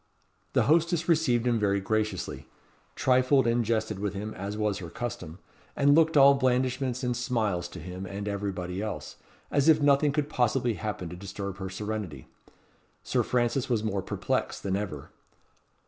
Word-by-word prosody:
The - - +4
hostess 165 +2 +2
received 140 -8 +2
him 120 -2 +2
very 100 -1 +2
graciously; 110 +2 -2 0.5
trifled 130 +1 +3
and 120 0 +2
jested 110 -2 -1
with 100 0 -2
him 105 +2 -4
as 100 +2 -5
was 105 -2 0
her 85 -3 -7
custom, 90 -7 -6 0.4
and 145 0 +4
looked 160 0 +4
all 140 0 +8
blandishments 130 -1 0
and 125 -1 0
smiles 110 -8 -1
to - - -10
him 90 +4 -7
and 100 +3 -5
everybody 95 -2 -3
else, 110 -1 -5 0.3
as 140 +2 +3
if 160 - +6
nothing 145 0 +4
could 145 0 -1
possibly 120 -3 +1
happen 105 -5 -4
to 90 - -7
disturb 100 +1 -6
her 95 -1 -4
serenity. 100 -7 -5 0.8
Sir - - +1
Francis 125 +2 0
was 115 -3 +1
more 100 -3 -1
perplexed - - -2
than 95 -1 0
ever. 90 -9 -5
110 Hz, 160 wpm, -28 LUFS, 100-130 Hz, 0.8 s, all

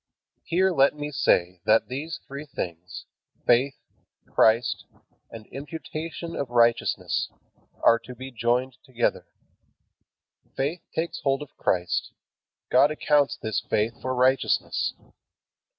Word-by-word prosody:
Here 185 +4 +2
let 140 -3 +4
me 150 0 -5
say, 90 -9 +2
that 110 +1 +4
these 150 +5 -5
three 140 +2 -8
things, 90 - -6 0.4
faith, 130 +3 +4 0.5
Christ, 115 +2 +3 0.4
and 110 -2 -10
imputation 160 +3 -6
of 140 - -3
righteousness, 120 -1 +2 0.5
are 115 - +6
to 125 +1 -11
be 130 +2 -8
joined 120 +2 0
together. 125 -4 -1 1.3
Faith 150 +6 -1
takes 165 +1 -2
hold 135 +1 0
of 145 - -15
Christ. 90 -1 0 0.6
God 135 +3 +6
accounts 150 -2 +2
this 110 -2 -1
faith 115 +3 -1
for 130 0 -2
righteousness. 130 +1 +2
130 Hz, 115 wpm, -26 LUFS, 115-145 Hz, 1.3 s, are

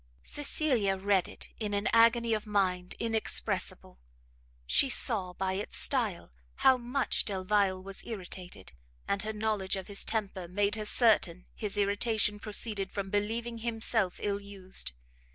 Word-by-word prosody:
Cecilia 260 -9 0
read 195 -1 +2
it - - -8
in 210 -2 -2
an 200 +1 0
agony 230 0 +5
of 215 0 -2
mind 185 -3 0
inexpressible: 220 - 0 0.7
she 270 - +3
saw, 200 -9 +3
by 190 +1 -2
its 200 +2 -4
style, 225 - +1 0.2
how 265 - +5
much 250 +3 0
Delvile 195 -1 +1
was 195 0 -7
irritated, 180 - -7 0.4
and 200 - 0
her 215 - -3
knowledge 210 -3 0
of 190 -1 -5
his 200 -1 -1
temper 195 -5 -3
made 200 +3 0
her 215 0 -2
certain 210 -6 +2
his 210 -2 -4
irritation 210 +1 +1
proceeded 205 -2 -1
from 195 -1 -4
believing 230 +3 -2
himself 225 -4 +1
ill 200 -1 -1
used. 190 - -2
205 Hz, 140 wpm, -30 LUFS, 190-225 Hz, 0.7 s, agony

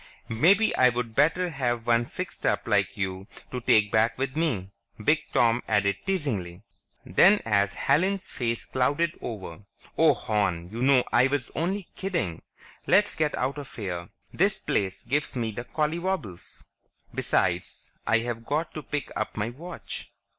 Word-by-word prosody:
Maybe 185 - +4
I'd 125 -2 +3
better 165 +7 +3
have 120 -6 -1
one 120 0 +3
fixed - - -6
up - - +1
like - - +1
you 95 0 -3 0.2
to 125 - -4
take 105 -3 +4
back 110 +2 +2
with 130 0 -2
me," 120 - -1 0.3
Big 150 +8 +3
Tom 120 0 +3
added 100 -2 +2
teasingly. 110 - -2 0.4
Then 190 - +5
as 100 -2 +2
Helen's 190 +4 +1
face 115 -2 -3
clouded 145 +6 +1
over, 95 -7 -6 0.4
"Oh, 160 0 +6
hon, 95 -6 -1
you 115 +4 -6
know 130 -1 +5
I 120 +2 +6
was 135 -3 -1
only 185 +3 -2
kidding. 170 - -2 0.5
Let's 205 +1 +4
get 155 -1 0
out 135 +3 -1
of 140 - -9
here; 90 -5 -4 0.2
this - - +2
place 95 -1 -2
gives 140 +5 -1
me 115 -3 -1
the 120 +3 -6
collywobbles. 155 - -3 0.5
Besides, 90 0 -1
I've 115 0 +1
got 155 +6 -2
to 155 - -5
pick 145 -2 -4
up - - -3
my 105 +3 -1
watch." 170 +8 -8
120 Hz, 150 wpm, -27 LUFS, 105-155 Hz, 0.5 s, Oh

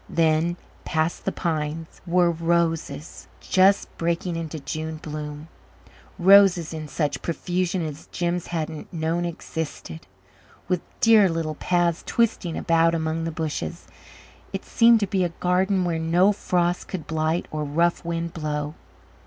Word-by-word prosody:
Then, 165 +1 +2 0.3
past 160 0 -1
the - - +1
pines, 160 -1 -3
were 175 0 +3
roses 165 -2 -1
just 195 +1 +3
breaking 170 +1 -1
into 165 -1 -4
June 155 +2 -4
bloom 150 0 -7 0.7
roses 185 -3 +6
in 155 -1 -5
such 145 0 -2
profusion 175 +1 -1
as 150 -1 -7
Jims 175 -1 -2
hadn't 160 -2 -4
known 165 +1 -1
existed, 160 -1 -6 0.6
with 180 -1 0 0.2
dear 220 -4 +6
little 165 -2 -2
paths 175 +1 +1
twisting 220 -7 0
about 165 -1 +3
among 160 0 -1
the 165 - -2
bushes. 160 +1 -4 0.7
It - - -5
seemed 230 -1 +5
to - - +3
be 190 -1 +1
a 175 - +1
garden 185 +1 +1
where 165 -2 -1
no 175 +5 +4
frost 175 -3 0
could 180 -5 -5
blight 160 +1 -1
or 155 -1 -2
rough 170 +4 +1
wind 170 0 -3
blow. 150 -2 -3
165 Hz, 135 wpm, -24 LUFS, 160-175 Hz, 0.7 s, roses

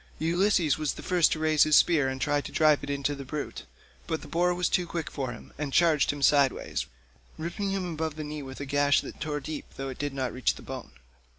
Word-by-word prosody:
Ulysses 170 -2 +2
was 155 -2 0
the - - -10
first 180 -3 +3
to - - +1
raise 155 -1 +2
his 155 -1 +6
spear 150 -6 +4
and 130 0 -4
try 145 +1 +1
to - - -8
drive 155 -2 +4
it 145 - -5
into 140 0 -1
the 140 -1 -7
brute, 145 +2 -5 0.4
but 160 - -2
the - - -10
boar 175 +1 +2
was 180 -1 +1
too 180 -2 +1
quick 165 -2 -4
for 130 -3 -3
him, 115 - -11
and 145 -2 -2
charged 160 -2 +4
him 145 -1 -6
sideways, 140 -2 +2 0.5
ripping 170 +5 -3
him 185 -3 -2
above 160 -1 -3
the 155 - -5
knee 150 0 -5
with 130 -1 -8
a 140 - -4
gash 145 +1 +3
that - - -9
tore 150 -1 -2
deep 150 +1 -6
though 135 0 -4
it 130 - -8
did 145 -1 -3
not 130 -2 -2
reach 130 -1 +1
the - - -12
bone. 70 - -8
150 Hz, 240 wpm, -28 LUFS, 140-165 Hz, 0.5 s, his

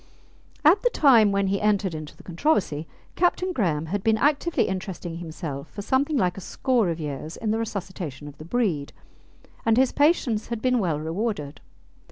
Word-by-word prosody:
At 360 +7 +6
the - - +3
time 240 - +5
when 200 0 +1
he 195 +1 0
entered 205 -3 +1
into 155 -1 -7
the - - -15
controversy, 170 - 0 0.3
Captain 365 +1 +1
Graham 165 - 0
had 190 +4 -3
been 220 -1 +3
actively 295 +6 +2
interesting 185 -3 -4
himself 155 -4 -6
for 205 - -7
something 280 +6 +1
like 180 -5 +1
a - - -6
score 240 0 +1
of 165 0 -3
years 150 +1 -5
in 220 -2 -1
the 220 - 0
resuscitation 185 -9 -5
of 145 - -12
the 155 - -9
breed, 175 -9 -1 0.7
and 225 0 +3
his 260 0 +4
patience 285 -8 +2
had 235 -1 -3
been 250 +1 +2
well 165 -7 0
rewarded. 160 -2 -3
200 Hz, 180 wpm, -25 LUFS, 165-245 Hz, 0.7 s, At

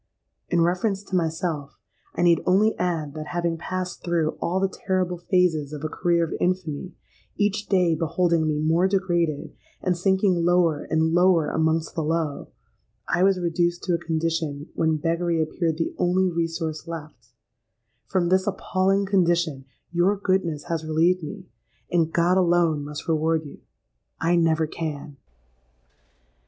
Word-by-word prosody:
In 170 - +2
reference 190 +4 0
to 195 - -5
myself, 160 -4 -2 0.4
I - - 0
need 170 -1 +4
only 205 +4 +4
add 165 -5 -1
that 155 0 -6
having 170 -1 0
passed 185 +2 -5
through 165 -3 +1
all 180 +2 0
the 195 - +2 0.2
terrible 185 -2 0
phases 170 -5 +1
of 150 0 -7
a 155 - -2
career 170 +1 +1
of 165 - -3
infamy,—each 185 +4 -3
day 180 -4 +3
beholding 165 0 +1
me 155 -1 0
more 165 +4 +2
degraded, 175 -6 0 0.3
and 180 - 0
sinking 190 -1 +2
lower 170 -3 +2
and 160 0 +1
lower 175 -2 +4
amongst 160 0 0
the 165 - -2
low,—I 160 +2 -4
was 190 0 +4
reduced 175 0 0
to 180 - 0
a 170 - +1
condition 160 -3 -2
when 160 -1 +1
beggary 170 +2 0
appeared 160 0 -1
the 165 - -2
only 180 +1 +2
resource 165 -1 -3
left 155 -8 -8 0.8
From 175 -2 +1
this 185 +1 +2
appalling 195 0 +1
condition 170 -7 +1 0.3
your 180 +4 +2
goodness 185 -6 0
has 165 -2 -3
relieved 165 +4 +2
me; 185 +5 -7 0.5
and 165 -2 +2
God 175 +3 +3
alone 170 -4 +2
must 150 +4 -7
reward 160 0 +1
you—I 145 - -5
never 165 -2 +2
can!" 150 -2 -6
170 Hz, 145 wpm, -24 LUFS, 160-180 Hz, 0.8 s, need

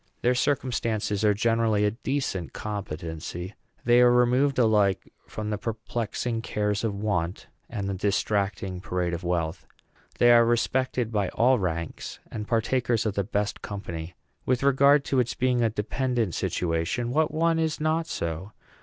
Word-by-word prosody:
Their 125 - +4
circumstances 115 -6 0
are 105 -1 +4
generally 115 -1 +2
a 105 - +2
decent 120 - -3
competency. 90 -2 -5 0.3
They 120 +1 +6
are 125 - +7
removed 125 +3 +3
alike 105 -5 +2
from 110 0 -5
the 105 - -2
perplexing 115 +1 -3
cares 105 -2 -1
of 110 -3 -1
want 100 -3 -2 0.2
and 110 -3 -4
from 100 - -2
the 95 - -6
distracting 100 -2 0
parade 90 -2 -2
of 85 +1 -4
wealth. 85 -1 -2 0.5
They 120 0 +6
are 120 0 +7
respected 120 0 0
by 105 -4 0
all 125 +1 +3
ranks, 85 -3 -4
and 105 -1 -5
partakers 120 0 +1
of 105 - 0
the 100 - 0
best 105 +1 -2
company. 85 -4 -6 0.3
With 130 0 0
regard 140 +1 +5
to 135 - +1
its 120 -1 0
being 125 -1 +1
a 115 - +3
dependent 115 -1 -1
situation, 90 +8 -1
what 155 +3 +2
one 165 +1 +2
is 160 -1 0
not 160 +1 0
so? 85 - -4
110 Hz, 155 wpm, -26 LUFS, 100-125 Hz, 0.5 s, are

